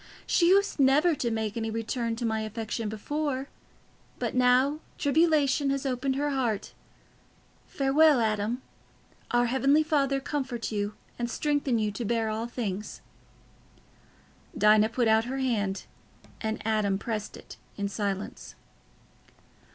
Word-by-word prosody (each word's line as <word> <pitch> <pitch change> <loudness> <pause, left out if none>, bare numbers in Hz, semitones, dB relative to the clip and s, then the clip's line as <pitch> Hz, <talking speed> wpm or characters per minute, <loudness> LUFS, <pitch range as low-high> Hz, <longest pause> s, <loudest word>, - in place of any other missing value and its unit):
She 340 - +3
used 400 -2 +3
never 285 +6 +4
to 250 -5 -1
make 220 -2 -2
any 225 -1 -2
return 230 +1 -2
to 235 +1 -4
my 220 -1 0
affection 220 0 -4
before, 275 +5 -3 0.7
but - - -2
now 255 +4 +3 0.2
tribulation 290 -2 +2
has 275 0 -1
opened 265 +1 -1
her 290 +1 0
heart. 240 -7 -1 0.9
Farewell, 280 +1 +4
Adam. 220 +2 -1 0.7
Our 240 0 +3
heavenly 270 +5 +3
Father 275 -3 +1
comfort 265 -5 -3
you 205 0 -2 0.2
and 240 0 -1
strengthen 290 -2 0
you 215 -1 0
to 205 +4 -5
bear 225 0 0
all 220 +2 -3
things." 210 -4 -5 1.6
Dinah 215 +1 +5
put 235 +1 0
out 220 +1 +4
her 260 +2 -4
hand, 215 -7 -1 0.6
and 220 0 -2
Adam 215 -3 +1
pressed 215 0 -4
it - - -12 0.2
in 200 -1 -1
silence. 200 -1 -4
240 Hz, 130 wpm, -28 LUFS, 220-275 Hz, 1.6 s, Dinah